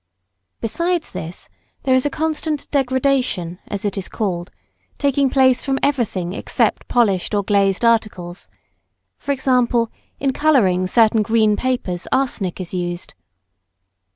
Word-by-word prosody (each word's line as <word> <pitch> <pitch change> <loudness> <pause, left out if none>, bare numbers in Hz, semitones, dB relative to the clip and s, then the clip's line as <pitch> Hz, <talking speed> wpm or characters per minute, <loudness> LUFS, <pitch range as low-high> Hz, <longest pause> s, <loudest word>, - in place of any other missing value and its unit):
Besides 340 +8 -1
this, 165 +2 -7 0.4
there 265 - +2
is 260 +2 +3
a - - -1
constant 310 0 -2
degradation, 260 - 0
as 205 0 -4
it 200 -1 -1
is 190 - -6
called, 180 -4 -3 0.5
taking 280 -1 +2
place 260 -1 +3
from 270 -1 0
everything 215 -11 0
except - - 0
polished 210 -4 +1
or 205 - +1
glazed 200 +2 +2
articles 205 -6 0 0.8
E.g. 270 -1 +1 0.7
in 270 -1 0
colouring 200 -13 +3
certain 220 +2 +4
green 215 0 +3
papers 205 -8 -2
arsenic 230 -10 0
is 185 -1 -6
used. 175 -1 -4
225 Hz, 125 wpm, -20 LUFS, 185-270 Hz, 0.8 s, certain